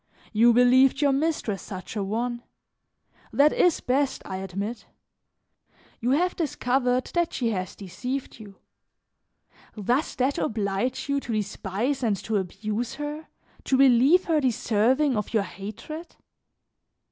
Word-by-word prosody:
You 230 +3 +6
believed 250 +3 +5
your 285 -2 +3
mistress 275 -8 -1
such 185 +2 -8
a 205 - -1
one; 235 +4 -2 0.9
that 295 +2 +4
is 355 -3 +3
best, 270 +2 0
I 190 - -5
admit. 195 +5 -5 1.1
You 240 - -1
have 350 +7 +2
discovered 255 -5 0
that 345 -1 0
she 235 -3 0
has 185 -3 -4
deceived 250 +8 -5
you; 205 -3 -12 1.2
does 245 +9 0
that 265 +2 0
oblige 210 +4 -1
you 280 0 +1
to 240 -4 -5
despise 215 +5 -2
and 220 -5 +1
to 220 -1 0
abuse 210 +5 -3
her, 295 +2 -5 0.4
to 265 - +2
believe 270 +6 +5
her 315 -3 +2
deserving 255 +3 +2
of 210 +2 -3
your 210 - +3
hatred? 215 - -8
245 Hz, 130 wpm, -26 LUFS, 210-275 Hz, 1.2 s, You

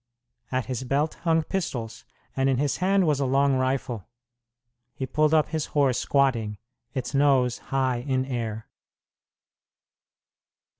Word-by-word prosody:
At 130 -1 0
his 130 0 -3
belt 140 +5 0
hung 165 -1 +3
pistols, 120 -11 -4 0.3
and 135 0 +2
in 130 - +2
his 140 +1 0
hand 190 +1 +2
was 150 -3 +2
a 140 - +1
long 140 +1 +3
rifle. 130 -5 -2 0.9
He 130 - -3
pulled 150 +4 +2
up 155 -1 +3
his 155 -1 -2
horse 135 -4 +3
squatting, 120 -7 +1 0.4
its 125 0 -3
nose 135 -3 +3
high 130 -2 +1
in 130 +1 -1
air. 115 -4 -4
135 Hz, 135 wpm, -26 LUFS, 125-145 Hz, 0.9 s, hung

